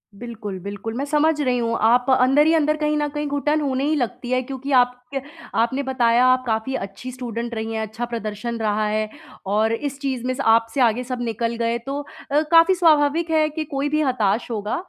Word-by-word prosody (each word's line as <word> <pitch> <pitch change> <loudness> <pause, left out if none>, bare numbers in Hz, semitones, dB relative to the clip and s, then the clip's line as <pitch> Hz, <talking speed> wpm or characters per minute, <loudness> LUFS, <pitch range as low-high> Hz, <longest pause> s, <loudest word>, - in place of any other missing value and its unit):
बिल्कुल, 215 -3 -7
बिल्कुल, 200 +4 -6
मैं 275 +3 -2
समझ 300 +1 +2
रही 255 -3 +1
हूँ। 230 -1 0
आप 245 +3 +4
अंदर 270 +4 +4
ही 325 - +4
अंदर 305 -1 +2
कहीं 300 0 0
न 295 0 0
कहीं 295 0 -3
घुटन 295 +2 0
होने 270 -2 -1
ही 310 - +1
लगती 245 -2 -3
है 255 0 +2
क्योंकि 270 +2 -6
आप 250 -1 +4
क - - -33 0.5
आपने 260 +5 +1
बताया, 245 -2 +2
आप 255 0 +3
काफ़ी 225 +3 -1
अच्छी 200 +4 -6
स्टूडेंट 235 -1 -5
रही 225 0 -4
हैं, 220 - -2
अच्छा 220 +3 -4
प्रदर्शन 230 0 -4
रहा 215 -1 0
है 215 0 -1 0.4
और 215 +3 +2
इस 280 +3 -4
चीज़ 265 -4 -3
में 255 - 0
से 275 +2 -4
आपसे 225 +3 +3
आगे 240 +1 +2
सब 250 -1 -5
निकल 230 0 -2
गए, 230 0 0
तो 275 +4 -5
अ, 290 +1 -2
काफ़ी 335 +3 +7
स्वाभाविक 320 -1 +3
है 310 -1 +3
कि 310 +1 -4
कोई 285 0 -2
भी 305 +1 +1
हताश 245 -5 0
होगा। 210 -1 -2
250 Hz, 215 wpm, -22 LUFS, 225-285 Hz, 0.5 s, काफ़ी